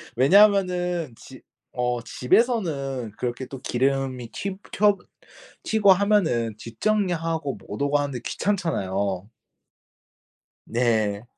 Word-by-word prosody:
왜냐하면은 180 Hz, -, +3 dB
집 130 Hz, +2 st, -14 dB, 0.3 s
어 125 Hz, -1 st, -1 dB
집에서는 140 Hz, -, 0 dB
그렇게 125 Hz, +1 st, -3 dB
또 135 Hz, -, -8 dB
기름이 130 Hz, -1 st, -1 dB
튀 195 Hz, -, -5 dB
켜 205 Hz, 0 st, +4 dB, 0.7 s
튀고 210 Hz, -3 st, +4 dB
하면은 180 Hz, -, +2 dB
뒷정리하고 165 Hz, -, -1 dB
못 -, -, -8 dB
오고 145 Hz, +1 st, +2 dB
하는데 140 Hz, -3 st, -2 dB
귀찮잖아요. 100 Hz, -, -2 dB, 1.4 s
네. 110 Hz, -3 st, 0 dB
140 Hz, 220 characters per minute, -24 LUFS, 120-190 Hz, 1.4 s, 켜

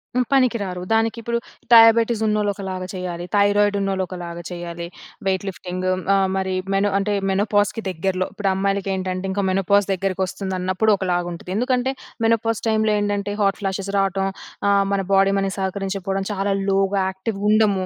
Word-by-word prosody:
హ్మ్. 250 Hz, 0 st, +2 dB
పనికిరారు 225 Hz, -9 st, +1 dB
దానికిప్పుడు 225 Hz, +1 st, 0 dB, 0.4 s
డయాబెటిసున్నోళ్ళు 225 Hz, -2 st, +5 dB
ఒకలాగా 190 Hz, -2 st, -5 dB
చేయాలి. 180 Hz, -2 st, -4 dB
థైరాయిడున్నోళ్ళు 200 Hz, -1 st, +2 dB
ఒకలాగా 175 Hz, -2 st, -7 dB
చేయాలి 170 Hz, -1 st, -6 dB, 0.4 s
వెయిట్ 190 Hz, 0 st, 0 dB
లిఫ్టింగు. 185 Hz, 0 st, -3 dB, 0.4 s
మరి 190 Hz, -1 st, -1 dB, 0.2 s
మెనో 195 Hz, +1 st, +2 dB
అంటే 205 Hz, +1 st, -1 dB, 0.2 s
మెనోపాజ్‍కి 205 Hz, +2 st, +1 dB
దగ్గరలో, 185 Hz, +1 st, -1 dB
ఇప్పుడు 205 Hz, -2 st, -1 dB
అమ్మాయిలకేంటంటే 190 Hz, -1 st, -1 dB
ఇంకా 200 Hz, +1 st, -1 dB
మెనోపాజ్ 195 Hz, +1 st, +2 dB
దగ్గరికొస్తుందన్నప్పుడు 190 Hz, +1 st, 0 dB
ఒకలాగా 175 Hz, -2 st, -1 dB
ఉంటది. 170 Hz, +2 st, -8 dB
ఎందుకంటే 250 Hz, +3 st, +1 dB, 0.3 s
మెనోపాజ్ 225 Hz, -1 st, +1 dB
టైమ్‌లో 220 Hz, -1 st, +2 dB
ఏంటంటే 205 Hz, 0 st, -1 dB
హాట్ 195 Hz, -1 st, +1 dB
ఫ్లాషెస్ 195 Hz, 0 st, -2 dB
రావటం 195 Hz, 0 st, +1 dB, 0.4 s
ఆహ్, 200 Hz, 0 st, +4 dB
మన 200 Hz, -, +1 dB
బాడీ 195 Hz, 0 st, +5 dB
మనకు 195 Hz, 0 st, -1 dB
సహకరించకపోడం 195 Hz, 0 st, -2 dB
చాలా 200 Hz, 0 st, 0 dB, 0.2 s
లోగా 195 Hz, 0 st, +2 dB
యాక్టివ్ 190 Hz, +2 st, -4 dB
ఉండము. 210 Hz, -3 st, +3 dB
195 Hz, 130 wpm, -22 LUFS, 190-205 Hz, 0.4 s, డయాబెటిసున్నోళ్ళు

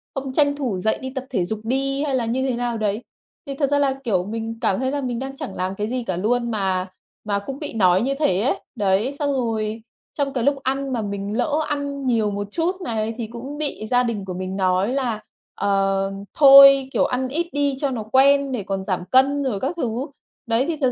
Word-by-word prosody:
không 270 Hz, -1 st, -4 dB
tranh 285 Hz, 0 st, +3 dB
thủ 250 Hz, -10 st, -2 dB
dậy 220 Hz, +4 st, 0 dB
đi 260 Hz, -, -4 dB
tập 265 Hz, -, -4 dB
thể 185 Hz, -9 st, 0 dB
dục 215 Hz, +4 st, -4 dB
đi 275 Hz, +4 st, 0 dB
hay 275 Hz, -3 st, 0 dB
là 245 Hz, -, 0 dB
như 250 Hz, +3 st, -1 dB
thế 255 Hz, -, 0 dB
nào 240 Hz, -1 st, -2 dB
đấy." 210 Hz, 0 st, -1 dB, 0.4 s
Thì 275 Hz, -, -5 dB
thật 275 Hz, -1 st, 0 dB
ra 285 Hz, 0 st, +2 dB
là, 275 Hz, -2 st, +2 dB
kiểu, 190 Hz, -7 st, +1 dB
mình 225 Hz, +2 st, -4 dB
cảm 190 Hz, -, +1 dB
thấy 260 Hz, 0 st, 0 dB
là 285 Hz, 0 st, -2 dB
mình 245 Hz, -3 st, -3 dB
đang 270 Hz, +1 st, -5 dB
chẳng 195 Hz, -, -6 dB
làm 185 Hz, +1 st, -2 dB
cái 210 Hz, +2 st, -2 dB
gì 250 Hz, 0 st, -2 dB
cả 185 Hz, -5 st, -3 dB
luôn 235 Hz, +5 st, 0 dB
mà 190 Hz, -3 st, -1 dB, 0.4 s
mà 200 Hz, -1 st, 0 dB
cũng 265 Hz, +7 st, -7 dB
bị 295 Hz, -, -6 dB
nói 185 Hz, -4 st, +4 dB
như 265 Hz, +4 st, 0 dB
thế 190 Hz, -11 st, +2 dB
ấy. 250 Hz, -, 0 dB, 0.2 s
Đấy, 205 Hz, +3 st, +1 dB
xong 285 Hz, 0 st, -1 dB
rồi 225 Hz, -3 st, -2 dB, 0.4 s
trong 280 Hz, -2 st, -1 dB
cái 245 Hz, -3 st, -1 dB
lúc 280 Hz, +1 st, +3 dB
ăn 270 Hz, 0 st, -1 dB
mà 235 Hz, -, -1 dB
mình 200 Hz, 0 st, -4 dB
lỡ 300 Hz, +4 st, +1 dB
ăn 285 Hz, -1 st, -3 dB
nhiều 225 Hz, -4 st, +1 dB
một 205 Hz, 0 st, -3 dB
chút 360 Hz, -, -1 dB
này 225 Hz, -5 st, -2 dB
thì 230 Hz, -3 st, -4 dB
cũng 245 Hz, +6 st, -8 dB
bị 285 Hz, -8 st, -4 dB
gia 250 Hz, +1 st, +3 dB
đình 225 Hz, -5 st, -3 dB
của 185 Hz, -, -5 dB
mình 185 Hz, +1 st, -4 dB
nói 190 Hz, +4 st, +1 dB
là, 240 Hz, -6 st, -1 dB, 0.3 s
ờ, 195 Hz, -1 st, +1 dB, 0.3 s
"Thôi, 275 Hz, -1 st, +9 dB
kiểu, -, -, +3 dB
ăn 255 Hz, +1 st, -1 dB
ít 325 Hz, +6 st, -2 dB
đi 285 Hz, -1 st, +1 dB
cho 280 Hz, -, 0 dB
nó 230 Hz, -4 st, -3 dB
quen 275 Hz, +4 st, +4 dB
để 245 Hz, -6 st, -2 dB
còn 195 Hz, 0 st, -3 dB
giảm 185 Hz, -2 st, -2 dB
cân 275 Hz, +2 st, +4 dB
rồi 225 Hz, -7 st, -1 dB
các 270 Hz, -, -1 dB
thứ." 245 Hz, -3 st, -2 dB, 0.4 s
Đấy, 235 Hz, +2 st, +1 dB
thì 330 Hz, -2 st, -2 dB
thật 255 Hz, -, +3 dB
245 Hz, 240 wpm, -22 LUFS, 210-275 Hz, 0.4 s, Thôi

